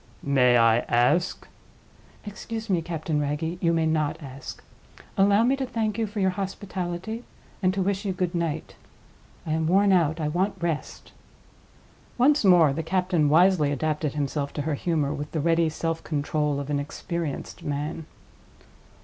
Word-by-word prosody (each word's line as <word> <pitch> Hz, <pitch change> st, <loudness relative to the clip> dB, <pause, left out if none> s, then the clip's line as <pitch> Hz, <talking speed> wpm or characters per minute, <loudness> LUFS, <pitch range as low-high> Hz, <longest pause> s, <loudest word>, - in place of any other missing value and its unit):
"May 125 Hz, -3 st, +4 dB
I 115 Hz, 0 st, +5 dB
ask—?" 125 Hz, +10 st, +2 dB, 0.8 s
"Excuse 220 Hz, +1 st, -6 dB
me, 175 Hz, -3 st, +2 dB
Captain 160 Hz, -2 st, -2 dB
Wragge—you 160 Hz, +4 st, -1 dB
may 165 Hz, -1 st, +1 dB
not 155 Hz, -1 st, 0 dB
ask. 135 Hz, -2 st, -9 dB, 0.5 s
Allow 200 Hz, +2 st, +4 dB
me 255 Hz, +3 st, +3 dB
to 270 Hz, -, -2 dB
thank 225 Hz, -3 st, -2 dB
you 225 Hz, -, 0 dB
for 210 Hz, +1 st, -5 dB
your 190 Hz, -1 st, +2 dB
hospitality, 190 Hz, +2 st, -4 dB, 0.4 s
and 185 Hz, -1 st, +3 dB
to 195 Hz, -, +1 dB
wish 195 Hz, +1 st, -1 dB
you 200 Hz, -, -1 dB
good 180 Hz, -1 st, -2 dB
night. 170 Hz, -3 st, -3 dB, 0.7 s
I 155 Hz, -, -3 dB
am 160 Hz, 0 st, 0 dB
worn 195 Hz, +3 st, +4 dB
out. 165 Hz, -3 st, +2 dB
I 155 Hz, -, -1 dB
want 185 Hz, +6 st, 0 dB
rest." 165 Hz, -3 st, -4 dB, 1.1 s
Once 280 Hz, +3 st, +4 dB
more 175 Hz, -7 st, +6 dB
the 160 Hz, -, -2 dB
captain 180 Hz, -2 st, +1 dB
wisely 165 Hz, -2 st, +4 dB
adapted 150 Hz, 0 st, -1 dB
himself 140 Hz, 0 st, -2 dB
to 145 Hz, -, -3 dB
her 155 Hz, +1 st, -1 dB
humor 150 Hz, -1 st, 0 dB
with 145 Hz, 0 st, -6 dB
the 160 Hz, -, -1 dB
ready 165 Hz, +1 st, +2 dB
self 165 Hz, +1 st, -3 dB
control 150 Hz, -1 st, -1 dB
of 140 Hz, +1 st, -5 dB
an 145 Hz, -, +1 dB
experienced 155 Hz, +1 st, -5 dB
man. 150 Hz, +2 st, -4 dB
165 Hz, 160 wpm, -25 LUFS, 150-190 Hz, 1.1 s, more